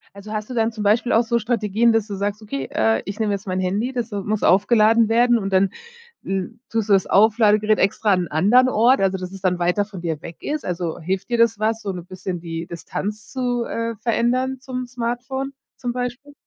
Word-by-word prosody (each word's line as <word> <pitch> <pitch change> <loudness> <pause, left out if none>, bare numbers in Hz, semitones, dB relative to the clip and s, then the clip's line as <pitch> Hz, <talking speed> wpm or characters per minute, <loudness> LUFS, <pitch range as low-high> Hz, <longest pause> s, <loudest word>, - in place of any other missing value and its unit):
Also, 200 +2 -9
hast 215 -1 -3
du - - -4
dann 225 -1 +1
zum 215 -1 -6
Beispiel 225 +4 +2
auch 225 - +5
so 235 +1 +1
Strategien, 230 0 +1
dass 225 -2 +1
du 205 - -5
sagst: 200 +2 -3
„Okay, 140 -10 -5
äh, 110 0 +1
ich 200 +1 -6
nehme 215 -2 +1
jetzt 200 +2 -4
mein 185 0 -1
Handy, 200 +7 -1
das, 240 -3 -4
äh, 200 - -2
muss 210 +1 -2
aufgeladen 215 +3 +4
werden 240 +1 +4
und 195 -2 -4
dann, 190 0 +3 0.5
hm, 195 +4 -4
tust 225 -2 -1
du - - +6
das 195 -2 +3
Auflade-Gerät 215 0 +4
extra 205 +2 +2
an 180 -2 +2
anderen 215 +12 +4
Ort? 250 +3 +4
Also, 190 -1 +1
dass 185 -1 -6
es 195 -1 -10
dann 180 -2 0
weiter 180 +4 +1
von 200 -4 -9
dir 160 -3 -3
weg 170 -1 -9
ist? 300 0 -3
Also, 175 -2 -3
hilft 185 +5 -3
dir 240 - +1
das 230 -2 +3
was, 220 +1 0
so 200 - -3
'ne 180 -2 -7
bisschen 185 0 -6
die 165 0 -6
Distanz 205 +5 -5
zu, 245 -2 -1
äh, 230 0 -3
verändern 250 +3 0
zum 255 -1 -5
Smartphone 250 +3 -4 0.2
zum 245 -1 -3
Beispiel? 250 +3 -5
215 Hz, 220 wpm, -22 LUFS, 190-235 Hz, 0.5 s, du